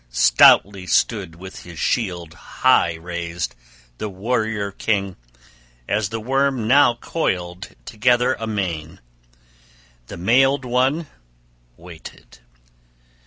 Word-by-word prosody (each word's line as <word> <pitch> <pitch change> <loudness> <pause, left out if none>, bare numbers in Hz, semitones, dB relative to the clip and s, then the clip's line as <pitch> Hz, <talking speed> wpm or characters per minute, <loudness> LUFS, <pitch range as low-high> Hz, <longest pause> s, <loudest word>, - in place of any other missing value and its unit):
Stoutly 65 +11 +4
stood 95 -7 0
with 95 +2 -10
his 85 -2 -12
shield 85 -6 -2
high 85 0 +1
raised 85 +1 -5 0.5
the 105 - -4
warrior 110 0 -2
king, 100 -2 -2 0.7
as 105 -1 -1
the 115 0 -4
worm 135 0 0
now 135 -1 +5
coiled 90 - -4
together 125 +3 +2
amain: 95 -8 -4 1.1
the - - -9
mailed 135 +8 +2
one 130 +6 0 0.7
waited. 85 -1 -13
100 Hz, 95 wpm, -21 LUFS, 85-120 Hz, 1.1 s, now